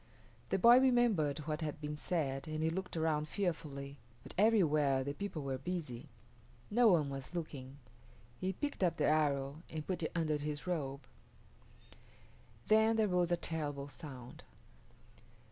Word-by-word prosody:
The - - +2
boy 235 +6 +8
remembered 240 - +3
what 155 +1 -2
had 155 -1 -3
been 150 0 -4
said 145 -4 -2
and 155 0 -2
he 160 - +2
looked 185 0 -4
around 155 -1 +1
fearfully, 145 -7 -3 0.3
but - - -10
everywhere 155 -11 +3
the 140 +1 -3
people 175 -3 -5
were 135 -1 -3
busy. 150 -4 -5 0.6
No 240 +2 +5
one 155 -8 +4
was 135 +5 -6
looking. 140 -5 -6 0.6
He 185 0 -1
picked 290 +6 -4
up 175 - +2
the - - +2
arrow 145 -1 +1
and 155 -1 -5
put 185 -2 -2
it 160 - -2
under 155 -3 +1
his 150 0 -4
robe. 145 -6 -2 1.7
Then 220 +1 +5
there 220 -1 +3
rose 180 -1 +2
a 175 - +3
terrible 145 -4 -3
sound. 130 -5 -9
155 Hz, 150 wpm, -35 LUFS, 140-180 Hz, 1.7 s, boy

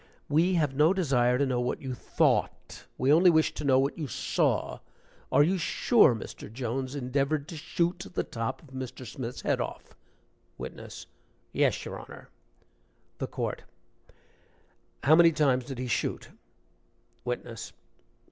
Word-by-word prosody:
"We 170 +5 +3
have 150 -5 +1
no 155 +7 +4
desire 125 -8 +2
to 140 - +2
know 125 -2 0
what 125 - -2
you 130 -2 -5
thought; - - 0
we 135 +3 +3
only 175 +3 +7
wish 160 -2 +3
to - - -6
know 135 -2 +4
what 135 +5 0
you 150 - -3
saw. 115 - 0 0.5
Are 145 - +6
you 185 +4 +1
sure 170 - +4
Mr. 105 - -8
Jones 130 +3 -3
endeavored 140 +3 -1
to 170 - -7
shoot 175 +4 -1
the - - -1
top 115 +7 -4
of 150 - -17
Mr. 130 -1 -7
Smith's 120 +1 -6
head - - 0
off?" - - -7 0.6
WITNESS. - - -8 0.5
"Yes, - - +1
your - - -6
Honor." - - -12 0.9
THE - - -2
COURT. - - -3 1.4
"How 150 +5 +7
many 170 0 +7
times 135 -5 +2
did 135 -1 -6
he 130 - -3
shoot?" 120 - -2 0.9
WITNESS. 120 -2 -5
135 Hz, 145 wpm, -28 LUFS, 125-160 Hz, 1.4 s, only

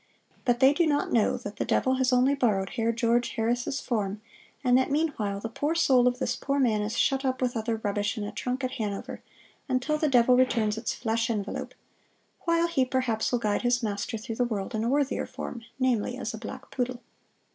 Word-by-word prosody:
But 240 -1 +2
they 265 +2 +7
do 335 +2 +2
not 290 -1 0
know 225 -3 +3
that 205 - -8
the - - 0
devil 260 0 +1
has 260 0 +2
only 255 +2 +4
borrowed 210 -8 +1
Herr 230 -3 0
George 235 +1 +1
Harris' 240 +4 0
form, 210 -4 -2 0.4
and 250 -1 +4
that 260 +2 +3
meanwhile 275 -10 -1
the 225 - -4
poor 290 +8 -2
soul 255 -6 +4
of 250 0 +1
this 260 - -1
poor 280 0 -2
man 230 -6 +2
is 210 +1 -3
shut 270 0 +2
up 260 -1 0
with 250 -1 0
other 225 0 -1
rubbish 205 +2 -1
in 210 - -2
a 205 - -4
trunk 255 +2 -3
at 255 - -1
Hanover, 210 -6 -4 0.5
until 260 +4 0
the 305 - +2
devil 250 -1 +5
returns 235 -4 +2
its 225 0 -3
flesh 230 +1 -1
envelope, 210 -3 -3 0.7
while 335 0 +3
he 335 -6 +1
perhaps 255 -4 0
will 245 - +2
guide 210 -3 0
his 245 0 +1
master 205 +1 -2
through 225 +1 -6
the 245 - +2
world 215 -2 -3
in 220 0 -1
a 230 - 0
worthier 280 0 0
form 235 - -6 0.2
namely 250 -2 0
as 230 -4 -4
a 220 - -6
black 220 - -8
poodle." 250 -1 -3
245 Hz, 210 wpm, -27 LUFS, 220-260 Hz, 0.7 s, they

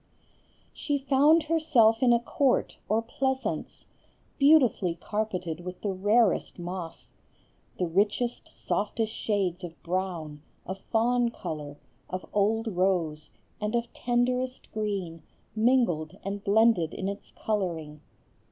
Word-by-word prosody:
She 290 -2 -1
found 280 +4 +4
herself 300 -9 +3
in 250 -2 +5
a 235 - +5
court 255 +2 0
or 220 +2 +2
pleasance, 265 +3 -3 0.5
beautifully 260 - +4
carpeted 185 -3 -3
with 180 +1 -8
the 200 -2 -1
rarest 205 +2 +2
moss. 175 -1 -6 0.6
The 180 - 0
richest, 205 +7 0
softest 220 +1 -2
shades 190 -4 -1
of 170 -1 -8
brown, 170 -5 -3 0.2
of 190 +2 -5
fawn 240 +3 +1
color, 150 -9 -6 0.3
of 185 0 -4
old 215 +3 +2
rose, 175 -6 0 0.3
and 210 +2 -1
of 235 0 -2
tenderest 250 +1 -1
green, 195 -6 -3 0.3
mingled 215 -9 +2
and 200 +1 -4
blended 205 -5 +3
in 190 - -3
its 200 +1 -6
coloring. 165 -8 -3
205 Hz, 115 wpm, -28 LUFS, 180-240 Hz, 0.6 s, in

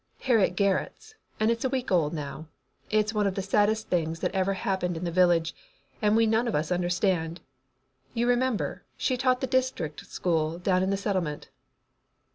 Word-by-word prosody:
"Hattie 230 -7 +3
Garrett's, 200 - -1 0.3
and 215 +1 +3
it's 230 0 -2
a 260 - +1
week 255 -3 -2
old 165 -5 +3
now. 155 0 -6 0.4
It 215 0 +3
is 215 - -4
one 210 -2 +1
of 190 - -2
the 195 - -2
saddest 210 +3 +1
things 165 -2 0
that - - -1
ever 195 0 +1
happened 185 -3 -1
in 165 - -5
the 170 - -2
village, 175 -2 +3 0.5
and 210 0 +3
we 225 0 +4
none 225 +2 +2
of 235 - -1
us 155 +3 -1
understand. 175 -1 0 0.8
You 235 +1 +1
remember, 245 -2 0
she 255 - 0
taught 255 0 +1
the - - +1
district 255 - -1
school 165 -2 -1
down 185 +1 +1
in 190 - +1
the 195 - +1
Settlement." 185 -7 -2
195 Hz, 185 wpm, -27 LUFS, 175-225 Hz, 0.8 s, we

